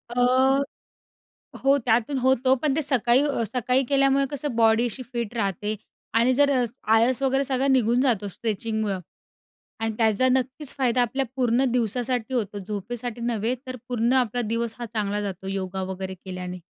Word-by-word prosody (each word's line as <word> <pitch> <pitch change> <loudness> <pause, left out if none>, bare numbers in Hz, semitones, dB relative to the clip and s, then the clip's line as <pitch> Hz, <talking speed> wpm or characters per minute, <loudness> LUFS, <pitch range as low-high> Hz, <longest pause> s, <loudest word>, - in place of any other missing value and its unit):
अ, 260 +2 +4 1.0
हो 275 +1 +5
त्यातून 240 +4 +1
होतो. 260 0 +3
पण 295 -3 +2
ते 315 - +1
सकाळी 260 -2 +3
अ, 280 -5 -1
सकाळी 250 +2 +1
केल्यामुळे 275 0 +3
कसं 285 -2 -3
बॉडी 225 0 +4
अशी 245 +3 -4
फिट 235 -1 -3
राहते 205 0 -1 0.4
आणि 235 +3 +4
जर 285 +2 +4
अ, 255 -3 +2 0.3
आळस 240 +4 +3
वगैरे 270 +1 +2
सगळा 265 0 0
निघून 245 -2 +3
जातो 230 -7 +1
स्ट्रेचिंगमुळे 220 0 -2 0.9
आणि 225 0 -1
त्याचा 225 +2 +3
नक्कीच 260 +2 -1
फायदा 250 -2 +2
आपल्या 265 +3 0
पूर्ण 250 0 +2
दिवसासाठी 245 +1 -1
होतो. 210 -4 -2
झोपेसाठी 215 +4 -5
नव्हे 235 0 -1
तर 255 0 -5
पूर्ण 240 0 +1
आपला 245 +1 -2
दिवस 230 -1 -1
हा 240 - -4
चांगला 205 -1 -1
जातो 190 -2 -5
योगा 190 -1 -3
वगैरे 190 0 -5
केल्याने. 180 -1 -6
240 Hz, 160 wpm, -24 LUFS, 220-260 Hz, 1.0 s, हो